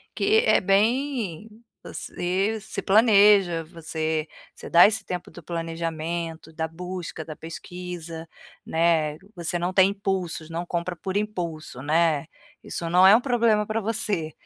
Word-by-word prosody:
que 435 +3 +3
é - - +4
bem 220 - 0 0.3
você 190 +5 -2
se 220 - -5
planeja, 200 -5 +5
você 160 -1 -3 0.3
você - - -10
dá 175 +3 +8
esse 215 -1 -1
tempo 180 -2 -5
do 175 - -13
planejamento, 165 0 -4
da 160 +1 -2
busca, 180 -1 -6
da 155 - -8
pesquisa, 165 0 -8 0.4
né. 160 -2 +1 0.2
Você 175 0 -2
não 180 +2 -2
tem 190 0 +5
impulsos, 190 -5 -3
não 170 +2 -4
compra 175 +1 -3
por 190 +3 -3
impulso, 170 -10 -4
né. 155 0 +2 0.4
Isso 170 - -4
não 180 +2 +5
é 195 - +9
um 240 - +3
problema 230 -5 +2
pra 220 +1 -1
você, 200 -7 -1
175 Hz, 140 wpm, -25 LUFS, 165-200 Hz, 0.4 s, é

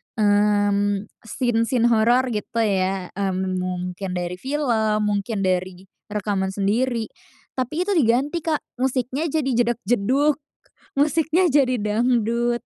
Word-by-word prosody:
mmm, 205 -1 +2 0.2
scene-scene 240 +1 +1
horor 240 +3 +3
gitu 230 +1 -2
ya. 190 -3 0
Mmm, 190 -1 -1
mungkin 180 +1 -4
dari 180 0 -3
film, 230 -5 0
mungkin 205 0 -2
dari 185 0 -1 0.2
rekaman 200 -2 -2
sendiri. 220 +3 0 0.5
Tapi 305 +7 -1
itu 405 - -2
diganti, 270 +5 +2
Kak, 315 -2 0 0.2
musiknya 260 +3 -1
jadi 295 -3 -1 0.2
jedag-jedug, 245 +5 +1 0.6
musiknya 320 +5 +2
jadi 260 -3 +3
dangdut. 235 +2 +1
225 Hz, 110 wpm, -22 LUFS, 200-255 Hz, 0.6 s, horor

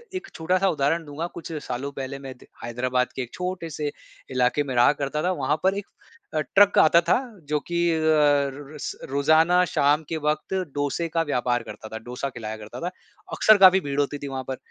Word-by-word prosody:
एक 370 +1 -5
छोटा-सा 185 +4 +1
उदाहरण 160 +1 0
दूँगा, 150 +3 -4
कुछ 170 0 -8
सालों 130 +3 -4
पहले 135 0 -6
मैं 135 -1 -8
त - - -17 0.2
हैदराबाद 125 +2 -1
के - - -2
एक 125 - -7
छोटे 180 -2 -4
से 150 -1 -3 0.4
इलाके 130 +3 +2
में 135 -2 -5
रहा 120 +2 +6
करता 140 +2 -1
था, 180 - +1
वहाँ 150 -3 0
पर 190 +1 +2
एक 200 - -4 0.5
अ, 155 - +1
ट्रक 200 +5 +4
आता 170 +2 +6
था। 175 - +2 0.3
जो 150 0 +1
कि 175 0 +1
अ, 160 - 0
र 145 -3 +2
र - - -9
स - - -4 0.2
रोज़ाना 160 +5 +4
शाम 145 +2 +3
के 165 - -2
वक़्त 155 +4 -1 0.2
डोसे 145 +4 -1
का 165 +1 0
व्यापार 125 -6 0
करता 110 - -9
था, 110 - -6
डोसा 125 +4 -5
खिलाया 110 -4 -6
करता 105 0 -9
था, 175 +2 -3 0.4
अक्सर 215 -1 +6
काफ़ी 190 -1 +7
भीड़ 140 0 -3
होती 145 0 0
थी 140 - -7
वहाँ 135 -1 -4
पर, 130 - -3
145 Hz, 210 wpm, -24 LUFS, 130-170 Hz, 0.5 s, काफ़ी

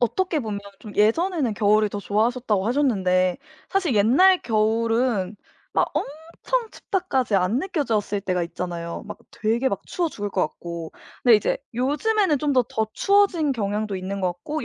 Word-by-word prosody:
어떻게 320 +6 0
보면 215 -3 -4 0.2
좀 210 - -10
예전에는 260 - +2
겨울을 210 +1 +3
더 205 - -5
좋아하셨다고 215 -1 0
하셨는데 190 -8 +2 0.3
사실 365 - 0
옛날 290 - +5
겨울은 225 -2 +1 0.4
막 - - +2
엄청 335 - -3
춥다까지 270 - -1
안 190 +6 +1
느껴졌을 230 - -1
때가 180 -2 -1
있잖아요. 170 0 -5
막 210 - -8
되게 230 +5 0
막 200 - -4
추워 345 -2 -1
죽을 205 -8 -5
것 190 - -1
같고. 170 -2 -7 0.3
근데 240 -3 +7
이제 210 - -1 0.2
요즘에는 300 - +1
좀 295 -1 +1
더, 255 -2 +3
더 220 -1 -1
추워진 390 - +3
경향도 210 -2 -2
있는 190 +1 -4
것 180 -1 0
같고 295 - -5
225 Hz, 335 characters per minute, -23 LUFS, 200-295 Hz, 0.4 s, 근데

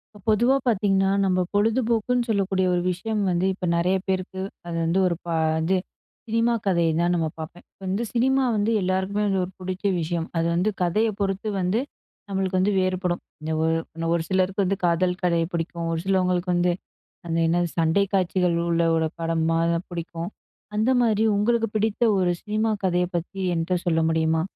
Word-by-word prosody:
இப்ப - - -13
பொதுவா 240 +5 +4
பாத்தீங்கன்னா, 195 -3 +2
நம்ப 185 -1 +2
பொழுதுபோக்குன்னு 230 +3 +1
சொல்லக்கூடிய 195 -3 +1
ஒரு 175 - +1
விஷயம் 210 +4 -2
வந்து 175 +1 +1
இப்ப 185 -1 -5
நெறைய 175 +3 +2
பேருக்கு, 190 0 -2 0.3
அது 170 - -4
வந்து 170 +4 +2
ஒரு 175 - 0
ப - - -11 0.4
இது, 190 +3 +2 0.5
சினிமா 230 +1 +2
கதய 170 -4 +2
தான் 175 +1 +2
நம்ம 165 -2 0
பாப்பேன். 160 +2 -8
இப்போ - - -44
வந்து 195 +5 -1
சினிமா 265 +3 +2
வந்து 210 +2 +1
எல்லாருக்குமே 190 +2 0
வந்து 195 -2 +1
ஒரு 180 - -11
புடிச்க 185 +1 -5
விஷயம். 165 0 -2
அது 165 0 +1
வந்து, 180 +5 +2
கதய 180 +6 +2
பொறுத்து 195 +1 -1
வந்து, 185 +5 +1 0.5
நம்மளுக்கு 190 -1 -1
வந்து 195 +3 +2
வேறுபடும். 185 -1 -1 0.2
இந்த 155 +1 -4
ஒ - - +2 0.3
இன்னும் 165 0 -2
ஒரு 165 - -1
சிலருக்கு 190 +1 +1
வந்து, 195 +2 0
காதல் 180 +1 +1
கதை 170 -2 +2
புடிக்கும். 170 0 -3
ஒரு 165 - -1
சிலவங்களுக்கு 180 -1 +1
வந்து 175 0 +2 0.6
அந்த 165 - -1
என்னது, 175 +1 +1
சண்டை 165 +5 +3
காட்சிகள் 180 -2 +2
உள்ள 170 0 +2
ஒரு 160 - +1
படமா 165 0 +1
தான் 170 +2 -3
புடிக்கும். 170 0 -5 0.5
அந்த 215 +4 +2
மாரி, 220 -2 +2
உங்களுக்கு 225 +2 +2
பிடித்த 215 +2 -1 0.2
ஒரு 180 -1 +2
சினிமா 215 +1 0
கதைய 180 -1 +2
பத்தி 175 +3 -6 0.2
என்ட்ட 165 +2 -1
சொல்ல 165 -2 +2
முடியுமா? 160 0 +1
185 Hz, 175 wpm, -24 LUFS, 170-205 Hz, 0.6 s, பொதுவா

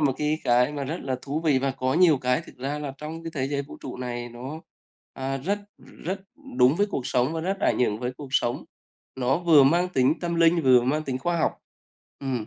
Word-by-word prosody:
một 140 -3 +3
cái 150 +1 0
cái 125 +4 +3
mà 140 -2 -3
rất 160 +6 -3
là 130 -1 -2
thú 145 +3 -3
vị 150 -5 +3
và 135 +1 0
có 130 0 -1
nhiều 165 -5 +5
cái 125 -1 +1
thực - - -14
ra 140 +3 -3
là 145 -2 -5
trong 160 +2 -7
cái 165 - -5
thế 135 -1 -1
giới 140 -1 -1
vũ 140 - -11
trụ 130 - -6
này 120 -1 -4
nó, 130 +7 -8 0.5
à, 135 0 -3
rất, 195 +10 -1 0.2
ừm, - - -17
rất 190 +4 -3 0.4
đúng 130 +5 +5
với 205 +2 +2
cuộc 130 -9 -3
sống 125 +5 +1
và 165 - -2
rất 190 +4 -2
ảnh - - +2
hưởng 110 -4 +1
với 125 0 -2
cuộc 145 -1 -8
sống, 120 -2 0 0.5
nó 130 +3 +1
vừa 165 -5 +6
mang 170 +6 +3
tính 130 -4 +2
tâm 170 -1 -2
linh, 165 0 +4
vừa 125 -2 +6
mang 150 +5 0
tính 130 -3 -2
khoa 170 +6 -1
học. - - +2 0.7
Ừm, 125 -5 -3
140 Hz, 240 wpm, -25 LUFS, 130-160 Hz, 0.7 s, vừa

